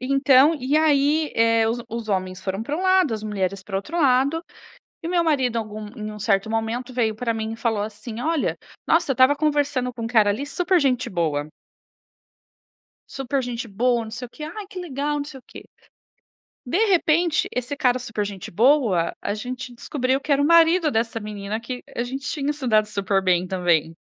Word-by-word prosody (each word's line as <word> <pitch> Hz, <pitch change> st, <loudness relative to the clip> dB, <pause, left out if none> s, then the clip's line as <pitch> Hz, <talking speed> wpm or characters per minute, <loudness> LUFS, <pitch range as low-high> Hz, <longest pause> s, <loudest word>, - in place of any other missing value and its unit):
Então 275 Hz, +3 st, +4 dB
e 280 Hz, 0 st, 0 dB
aí, 300 Hz, 0 st, +2 dB
eh, 230 Hz, 0 st, +3 dB
os 235 Hz, +2 st, -1 dB
os 230 Hz, -1 st, -5 dB
homens 185 Hz, -2 st, -2 dB
foram 195 Hz, +2 st, -3 dB
para 285 Hz, +6 st, -3 dB
um 360 Hz, -, -3 dB
lado, 375 Hz, -6 st, +3 dB
as 215 Hz, -, -6 dB
mulheres 195 Hz, -2 st, -2 dB
para 195 Hz, 0 st, -9 dB
o -, -, +2 dB
outro 330 Hz, -, -5 dB
lado, 275 Hz, +3 st, +3 dB, 0.6 s
e -, -, -3 dB
o -, -, -3 dB
meu 345 Hz, -1 st, +2 dB
marido 265 Hz, -7 st, +1 dB
algum 215 Hz, -1 st, -5 dB
em 215 Hz, -1 st, -5 dB
um 210 Hz, -, -9 dB
certo 200 Hz, 0 st, +1 dB
momento 225 Hz, +3 st, -2 dB
veio 225 Hz, -3 st, 0 dB
para 230 Hz, +1 st, -1 dB
mim 220 Hz, 0 st, -3 dB
e -, -, -6 dB
falou 225 Hz, -3 st, 0 dB
assim: 215 Hz, +2 st, -6 dB
"Olha, 320 Hz, +1 st, 0 dB, 0.3 s
nossa 330 Hz, -4 st, +3 dB
eu -, -, +2 dB
estava 260 Hz, +3 st, +5 dB
conversando 290 Hz, -4 st, 0 dB
com 230 Hz, -1 st, -7 dB
um -, -, -2 dB
cara 220 Hz, -3 st, +4 dB
ali 250 Hz, +8 st, -3 dB
super 355 Hz, +6 st, +1 dB
gente 255 Hz, -4 st, +1 dB
boa". 155 Hz, -5 st, -1 dB, 1.6 s
"Super 270 Hz, 0 st, -2 dB
gente 245 Hz, -1 st, -4 dB
boa, 235 Hz, +3 st, +1 dB
não 220 Hz, -, -9 dB
sei 230 Hz, +3 st, -6 dB
o -, -, -13 dB
que, 300 Hz, -, -10 dB
ai 360 Hz, +7 st, -6 dB
que 375 Hz, -, -7 dB
legal, 295 Hz, -3 st, -2 dB
não 290 Hz, -, -2 dB
sei 285 Hz, -2 st, -10 dB
o -, -, -25 dB
que". -, -, -11 dB, 1.0 s
De 255 Hz, +8 st, -1 dB
repente, 340 Hz, -3 st, +2 dB
esse 250 Hz, +3 st, -3 dB
cara 255 Hz, -4 st, +2 dB
super 225 Hz, -4 st, -3 dB
gente 200 Hz, -3 st, -7 dB
boa, 225 Hz, -, +3 dB
a -, -, -2 dB
gente 250 Hz, +3 st, -6 dB
descobriu 260 Hz, +2 st, -1 dB
que 295 Hz, -, -4 dB
era 280 Hz, -, +4 dB
o -, -, +3 dB
marido 335 Hz, 0 st, +5 dB
dessa 225 Hz, 0 st, -1 dB
menina 210 Hz, 0 st, -5 dB
que 250 Hz, +2 st, -6 dB
a 235 Hz, -, -1 dB
gente 265 Hz, +3 st, -5 dB
tinha 295 Hz, -2 st, -1 dB
se 285 Hz, -3 st, -5 dB
dado 215 Hz, -2 st, +4 dB
super 200 Hz, -2 st, 0 dB
bem 180 Hz, -1 st, +2 dB
também. 170 Hz, -3 st, +1 dB
245 Hz, 205 wpm, -23 LUFS, 215-290 Hz, 1.6 s, estava